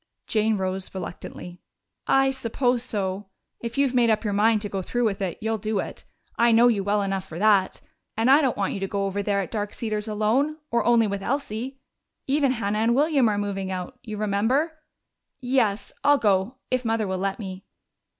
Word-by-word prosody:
Jane 215 Hz, -1 st, +1 dB
rose 190 Hz, 0 st, -3 dB
reluctantly. 175 Hz, -1 st, -7 dB, 0.5 s
"I 270 Hz, 0 st, +4 dB
suppose 245 Hz, -1 st, 0 dB
so. 200 Hz, -4 st, -3 dB, 0.3 s
If 235 Hz, +1 st, -6 dB
you've 275 Hz, -2 st, +2 dB
made 240 Hz, -2 st, +4 dB
up 220 Hz, 0 st, +2 dB
your 205 Hz, -2 st, -1 dB
mind 215 Hz, +1 st, +3 dB
to -, -, -2 dB
go 195 Hz, -1 st, -3 dB
through 240 Hz, +6 st, -1 dB
with 205 Hz, -2 st, -1 dB
it, 185 Hz, -3 st, -2 dB
you'll 220 Hz, 0 st, -1 dB
do 215 Hz, +1 st, -2 dB
it. -, -, -5 dB, 0.3 s
I 235 Hz, 0 st, +5 dB
know 235 Hz, +2 st, +6 dB
you 205 Hz, -4 st, +1 dB
well 205 Hz, +1 st, +1 dB
enough 195 Hz, -1 st, -2 dB
for 160 Hz, -, -8 dB
that. 200 Hz, -1 st, +3 dB, 0.4 s
And 225 Hz, +2 st, +2 dB
I 285 Hz, +3 st, +7 dB
don't 265 Hz, -4 st, 0 dB
want 200 Hz, -1 st, 0 dB
you 195 Hz, 0 st, -3 dB
over 200 Hz, 0 st, -1 dB
there 200 Hz, -1 st, 0 dB
at 190 Hz, -, -6 dB
Dark 210 Hz, -2 st, -3 dB
Cedars 215 Hz, -2 st, -3 dB
alone 225 Hz, +9 st, +1 dB
or 235 Hz, -, +2 dB
only 235 Hz, -1 st, +5 dB
with 200 Hz, -1 st, -3 dB
Elsie. 260 Hz, +1 st, -3 dB, 0.5 s
Even 275 Hz, -1 st, +2 dB
Hannah 210 Hz, -3 st, -1 dB
and 230 Hz, +2 st, +3 dB
William 280 Hz, -4 st, +3 dB
are 205 Hz, -, 0 dB
moving 195 Hz, -2 st, -2 dB
out, 180 Hz, -1 st, -5 dB
you 215 Hz, -2 st, -7 dB
remember.... 230 Hz, +10 st, 0 dB, 0.6 s
Yes, 230 Hz, -6 st, 0 dB
I'll 290 Hz, 0 st, +5 dB
go. 205 Hz, +1 st, +1 dB, 0.2 s
If 255 Hz, 0 st, +1 dB
Mother 225 Hz, -2 st, 0 dB
will 190 Hz, -1 st, -2 dB
let 195 Hz, 0 st, -1 dB
me." 190 Hz, -3 st, -7 dB
215 Hz, 195 wpm, -25 LUFS, 200-245 Hz, 0.6 s, I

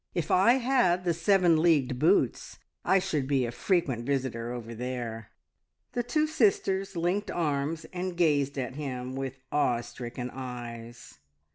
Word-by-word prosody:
If 170 Hz, -3 st, -1 dB
I 195 Hz, +6 st, +6 dB
had 245 Hz, -9 st, +2 dB
the 170 Hz, -, +2 dB
seven 170 Hz, -1 st, +3 dB
leagued 140 Hz, -7 st, +2 dB
boots, 175 Hz, +8 st, +2 dB, 0.3 s
I 190 Hz, -, +4 dB
should 150 Hz, -7 st, -1 dB
be 135 Hz, -3 st, +2 dB
a 120 Hz, -, -3 dB
frequent 135 Hz, -, 0 dB
visitor 125 Hz, -3 st, -2 dB
over 115 Hz, -1 st, -6 dB
there." 115 Hz, -2 st, -5 dB, 0.6 s
The 245 Hz, -, -1 dB
two 305 Hz, +6 st, +1 dB
sisters 195 Hz, -9 st, +1 dB
linked 175 Hz, +5 st, 0 dB
arms, 155 Hz, 0 st, -1 dB
and 180 Hz, -1 st, -4 dB
gazed 145 Hz, -5 st, +2 dB
at 130 Hz, -1 st, -3 dB
him 130 Hz, -3 st, -5 dB
with 135 Hz, -1 st, -4 dB
awe 125 Hz, -5 st, +2 dB
stricken 125 Hz, 0 st, -7 dB
eyes. 120 Hz, -, -8 dB
145 Hz, 145 wpm, -28 LUFS, 125-180 Hz, 0.6 s, I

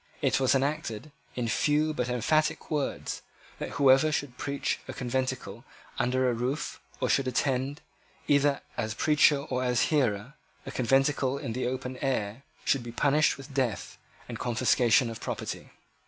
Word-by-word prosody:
It -, -, +2 dB
was 130 Hz, +1 st, +3 dB
enacted, 140 Hz, -1 st, -2 dB, 0.2 s
in 125 Hz, -2 st, -1 dB
few 150 Hz, +7 st, +2 dB
but 125 Hz, -4 st, -2 dB
emphatic 155 Hz, +8 st, +1 dB
words, 150 Hz, -2 st, -2 dB, 0.4 s
that -, -, -5 dB
whoever 140 Hz, +2 st, +5 dB
should 145 Hz, -4 st, -2 dB
preach 140 Hz, +2 st, -2 dB
in -, -, -4 dB
a -, -, -11 dB
conventicle 125 Hz, -3 st, -3 dB, 0.4 s
under 130 Hz, +1 st, +2 dB
a 125 Hz, -, +2 dB
roof, 130 Hz, +6 st, -3 dB, 0.2 s
or -, -, 0 dB
should 135 Hz, -1 st, +2 dB
attend, 130 Hz, +2 st, 0 dB, 0.5 s
either 145 Hz, -1 st, +3 dB, 0.2 s
as 110 Hz, -2 st, -2 dB
preacher 150 Hz, +1 st, +4 dB
or 130 Hz, -3 st, -3 dB
as 125 Hz, -2 st, +2 dB
hearer, 125 Hz, -3 st, +1 dB, 0.3 s
a -, -, -6 dB
conventicle 135 Hz, +1 st, +2 dB
in 115 Hz, -, -4 dB
the 125 Hz, +1 st, -1 dB
open 130 Hz, 0 st, -4 dB
air, 125 Hz, -4 st, -2 dB, 0.2 s
should 135 Hz, -, +2 dB
be 120 Hz, 0 st, -7 dB
punished 145 Hz, +5 st, +2 dB
with 135 Hz, 0 st, -11 dB
death 130 Hz, -6 st, -2 dB, 0.3 s
and -, -, -6 dB
confiscation 120 Hz, 0 st, +3 dB
of 115 Hz, -1 st, -7 dB
property. -, -, -5 dB
130 Hz, 155 wpm, -28 LUFS, 125-140 Hz, 0.5 s, whoever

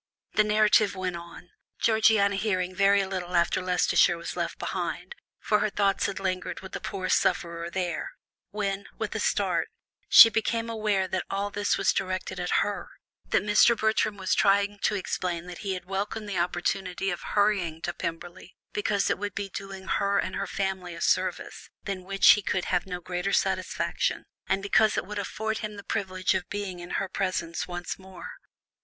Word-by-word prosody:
The 215 Hz, -, +4 dB
narrative 210 Hz, -1 st, +3 dB
went 185 Hz, -2 st, -3 dB
on, 170 Hz, +1 st, -11 dB, 0.3 s
Georgiana 215 Hz, -2 st, +4 dB
hearing 185 Hz, -3 st, -1 dB
very 200 Hz, +1 st, +4 dB
little 180 Hz, -2 st, -4 dB
after 170 Hz, +2 st, +2 dB
Leicestershire 180 Hz, -1 st, +3 dB
was 170 Hz, -, -6 dB
left -, -, -3 dB
behind, -, -, -4 dB, 0.3 s
for 210 Hz, -, +2 dB
her 215 Hz, -, +1 dB
thoughts 200 Hz, -1 st, +1 dB
had 195 Hz, -, -4 dB
lingered 185 Hz, -1 st, -3 dB
with 190 Hz, -, -10 dB
the -, -, -4 dB
poor 185 Hz, -1 st, -4 dB
sufferer 170 Hz, -1 st, 0 dB
there, 175 Hz, -1 st, -3 dB, 0.4 s
when, 200 Hz, -1 st, -3 dB
with -, -, -3 dB
a -, -, -2 dB
start, -, -, 0 dB, 0.4 s
she 225 Hz, -, +10 dB
became 230 Hz, +1 st, -1 dB
aware 210 Hz, -4 st, 0 dB
that 185 Hz, 0 st, -2 dB
all 200 Hz, +1 st, -2 dB
this 205 Hz, 0 st, 0 dB
was -, -, +2 dB
directed 185 Hz, -1 st, -3 dB
at 180 Hz, 0 st, -2 dB, 0.2 s
her, 205 Hz, -1 st, -4 dB, 0.4 s
that -, -, +2 dB
Mr. 210 Hz, +3 st, +5 dB
Bertram 220 Hz, -1 st, +1 dB
was 190 Hz, -1 st, 0 dB
trying 200 Hz, +1 st, +3 dB
to 210 Hz, -, +1 dB
explain 180 Hz, -3 st, -3 dB
that 180 Hz, -1 st, -9 dB
he 195 Hz, -2 st, -2 dB
had 185 Hz, -, -7 dB
welcomed 205 Hz, +3 st, -3 dB
the 195 Hz, -3 st, -2 dB
opportunity 180 Hz, +2 st, -1 dB
of 175 Hz, -, -4 dB
hurrying 195 Hz, -6 st, +1 dB
to -, -, -2 dB
Pemberley, 175 Hz, +2 st, -6 dB, 0.2 s
because 205 Hz, -1 st, 0 dB
it -, -, -1 dB
would 205 Hz, 0 st, -4 dB
doing 195 Hz, -1 st, -6 dB
her 200 Hz, +1 st, +1 dB
and -, -, -1 dB
her 195 Hz, -, -2 dB
family 190 Hz, -2 st, -3 dB
a -, -, -8 dB
service, -, -, -1 dB
than 195 Hz, -2 st, -4 dB
which 195 Hz, +1 st, +4 dB
he 210 Hz, -, +4 dB
could 185 Hz, -2 st, -1 dB
have 180 Hz, +1 st, 0 dB
no 180 Hz, -1 st, -5 dB
greater 180 Hz, +2 st, -2 dB
satisfaction, -, -, 0 dB, 0.2 s
and 195 Hz, -, 0 dB
because 215 Hz, +2 st, +3 dB
it -, -, -1 dB
would 210 Hz, +1 st, -5 dB
afford 220 Hz, +2 st, -3 dB
him 215 Hz, -2 st, -5 dB
the 200 Hz, -, -9 dB
privilege 185 Hz, -3 st, -1 dB
of 185 Hz, -2 st, -3 dB
being 200 Hz, -3 st, -4 dB
in 175 Hz, -, -9 dB
her 195 Hz, -, -1 dB
presence 185 Hz, -3 st, -2 dB
once 175 Hz, +1 st, -5 dB
more. 190 Hz, -2 st, -10 dB
195 Hz, 180 wpm, -27 LUFS, 180-205 Hz, 0.4 s, she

